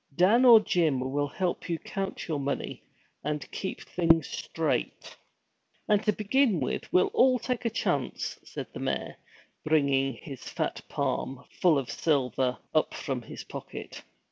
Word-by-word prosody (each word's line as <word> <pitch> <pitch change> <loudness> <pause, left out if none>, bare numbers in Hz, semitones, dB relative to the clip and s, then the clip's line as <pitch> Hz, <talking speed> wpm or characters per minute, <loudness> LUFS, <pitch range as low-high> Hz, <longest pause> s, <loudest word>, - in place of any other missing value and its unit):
Dan 215 - +5
or 235 -3 +10
Jim 165 -9 +1
will 140 +3 -1
help 175 +4 -2
you 170 - 0
count 195 +3 -5
your 155 -4 -1
money, 140 0 -3 0.4
and 150 0 -3
keep 190 - -4
things 165 -2 +3
straight.' - - -2 0.7
'And 210 -2 +4
to 210 - +4
begin 215 - +2
with, 130 - -3
we'll 180 - +4
all 255 0 +5
take 250 0 -3
a - - +3
chance!' 230 - -2
said - - -6
the - - -6
mayor, - - -2 0.5
bringing 140 -3 +2
his 135 +2 -9
fat - - -2
palm, 135 +1 -2
full 170 -5 +3
of 130 -4 -2
silver, 130 -3 +1 0.2
up 155 - +2
from 135 -4 -3
his 115 - -9
pocket. - - -8
160 Hz, 150 wpm, -28 LUFS, 135-200 Hz, 0.7 s, or